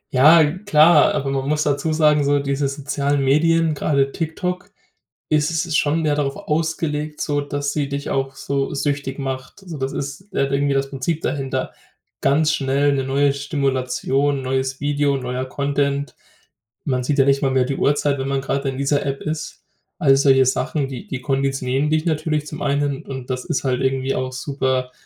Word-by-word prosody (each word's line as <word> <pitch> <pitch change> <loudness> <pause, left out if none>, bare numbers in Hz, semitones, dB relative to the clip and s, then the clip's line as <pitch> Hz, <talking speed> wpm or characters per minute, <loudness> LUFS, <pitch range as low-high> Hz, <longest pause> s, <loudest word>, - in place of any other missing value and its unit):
Ja, 155 +5 +7
klar, 160 -1 +4
aber 135 0 -1
man 135 0 -2
muss 150 0 +1
dazu 145 +1 0
sagen, 150 -1 +3
so 145 +1 +2
diese 140 0 -1
sozialen 140 0 -1
Medien, 165 +3 +3
gerade 140 -2 +1
TikTok, 180 +5 -3 0.6
ist 150 -1 +2
ist 165 0 -1
schon 155 +3 +1
mehr 150 -1 +2
darauf 140 -2 -1
ausgelegt, 155 -1 -2
sodass 145 -1 -2
sie 145 -2 -1
dich 140 0 -4
auch 135 0 -1
so 140 0 -2
süchtig 140 -1 -2
macht. 135 +6 -6
Also, 170 -6 -8
das 135 0 -2
ist, 145 +8 -6
äh, 140 - +2
irgendwie 140 0 0
das 135 0 -1
Prinzip 150 +4 -2
dahinter. 130 -1 -2 0.5
Ganz 155 +2 +3
schnell 140 +1 +1
'ne 135 -1 -1
neue 140 +1 +2
Stimulation, 140 0 -1
neues 130 0 -1
Video, 145 -1 +1
neuer 125 0 -3
Content. 140 +1 -1 0.7
Man 130 -3 0
sieht 140 +3 0
ja 135 - +6
nicht 140 0 +3
mal 135 - +2
mehr 130 -1 +2
die 135 +1 -3
Uhrzeit, 145 -1 +1
wenn 135 - -2
man 135 0 0
gerade 135 +1 -2
in 130 - -5
dieser 140 +1 +1
App 140 -1 -3
ist. 155 0 -5 0.4
All 140 -6 +5
solche 135 -1 +5
Sachen, 135 +2 0
die 130 -2 -8
die 130 - -5
konditionieren 135 +1 0
dich 155 +1 +1
natürlich 155 -2 -1
zum - - -7
einen, 140 -1 0
und 130 -2 -7
das 125 0 -3
ist - - -2
halt 130 -2 0
irgendwie 135 0 0
auch 130 0 -2
super 130 -1 -1
140 Hz, 180 wpm, -21 LUFS, 135-150 Hz, 0.7 s, Ja